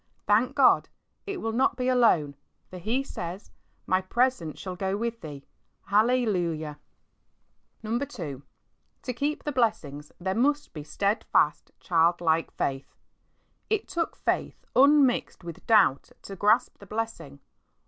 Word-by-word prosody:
thank 215 Hz, +5 st, +2 dB
God, -, -, +4 dB, 0.4 s
it 395 Hz, -2 st, -4 dB
will 225 Hz, -, -2 dB
not 250 Hz, +2 st, +1 dB
be 250 Hz, -1 st, -1 dB
alone, 220 Hz, -, +3 dB, 0.4 s
for 185 Hz, -, -8 dB
He 230 Hz, +9 st, -1 dB
says, 180 Hz, -6 st, -7 dB, 0.2 s
" -, -, -42 dB
My 185 Hz, 0 st, +2 dB
presence 210 Hz, -, 0 dB
shall 185 Hz, -1 st, -6 dB
go 190 Hz, +2 st, -2 dB
with 230 Hz, +1 st, -3 dB
thee." 145 Hz, -3 st, -9 dB, 0.4 s
Hallelujah! 190 Hz, -9 st, +1 dB, 1.1 s
II. 225 Hz, +2 st, 0 dB, 1.1 s
To 250 Hz, -, -3 dB
keep 290 Hz, +5 st, -2 dB
the 295 Hz, -, -2 dB
blessings 185 Hz, -, -1 dB
there 190 Hz, +1 st, -2 dB
must 285 Hz, +7 st, 0 dB
be 155 Hz, -, -6 dB
steadfast^ 200 Hz, +9 st, 0 dB
childlike 165 Hz, -1 st, +2 dB
faith. 135 Hz, 0 st, -4 dB, 0.7 s
It 435 Hz, -1 st, 0 dB
took 340 Hz, -2 st, -2 dB
faith -, -, -2 dB
unmixed 275 Hz, -6 st, +4 dB
with 170 Hz, -2 st, -10 dB
doubt 205 Hz, -12 st, +4 dB
to 195 Hz, -, -8 dB
grasp 215 Hz, +6 st, +2 dB
the 200 Hz, -, -14 dB
blessing. 215 Hz, -10 st, -5 dB
210 Hz, 130 wpm, -27 LUFS, 170-250 Hz, 1.1 s, God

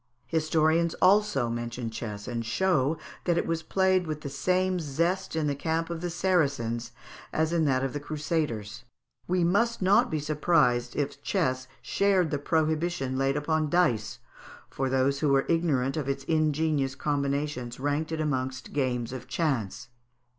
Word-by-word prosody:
Historians 160 Hz, +1 st, +2 dB
also 190 Hz, -, +3 dB
mention 120 Hz, 0 st, -4 dB
chess, 105 Hz, -2 st, -6 dB
and 120 Hz, -2 st, -3 dB
show 155 Hz, +2 st, +1 dB, 0.3 s
that 175 Hz, -1 st, +2 dB
it -, -, +1 dB
was 165 Hz, -1 st, -1 dB
played 185 Hz, +1 st, +2 dB
with 155 Hz, -1 st, -4 dB
the 140 Hz, -, -6 dB
same 185 Hz, +5 st, +1 dB
zest 170 Hz, +5 st, -1 dB
in 160 Hz, -2 st, 0 dB
the 145 Hz, -, +1 dB
camp 160 Hz, +3 st, -2 dB
of 165 Hz, -1 st, -4 dB
the 175 Hz, -, -2 dB
Saracens 140 Hz, -10 st, 0 dB, 0.4 s
as 160 Hz, +1 st, 0 dB
in 165 Hz, -2 st, +2 dB
that 130 Hz, -2 st, +2 dB
of 135 Hz, -, -2 dB
the 145 Hz, -, -3 dB
Crusaders. 145 Hz, -8 st, -3 dB, 0.4 s
We 180 Hz, 0 st, +1 dB
must 230 Hz, +7 st, +2 dB
not 205 Hz, +6 st, +4 dB
be 155 Hz, -, -1 dB
surprised 150 Hz, -5 st, +2 dB
if 145 Hz, -1 st, -2 dB
chess 130 Hz, -2 st, -1 dB, 0.2 s
shared 190 Hz, -5 st, +2 dB
the 145 Hz, -, -1 dB
prohibition 160 Hz, -2 st, 0 dB
laid 135 Hz, +1 st, +1 dB
upon 155 Hz, +1 st, 0 dB
dice, 125 Hz, -11 st, +1 dB, 0.5 s
for 135 Hz, 0 st, -1 dB
those 135 Hz, +1 st, +1 dB
who 150 Hz, -, +1 dB
were 135 Hz, 0 st, +3 dB
ignorant 150 Hz, -6 st, +1 dB
of 145 Hz, -3 st, -2 dB
its 135 Hz, 0 st, -2 dB
ingenious 155 Hz, -3 st, +1 dB
combinations 140 Hz, -4 st, -2 dB
ranked 145 Hz, +3 st, -1 dB
it 160 Hz, -, -2 dB
amongst 130 Hz, -4 st, -2 dB
games 125 Hz, -4 st, -1 dB
of 125 Hz, -1 st, -7 dB
chance. 130 Hz, -, -2 dB
150 Hz, 160 wpm, -28 LUFS, 130-165 Hz, 0.5 s, not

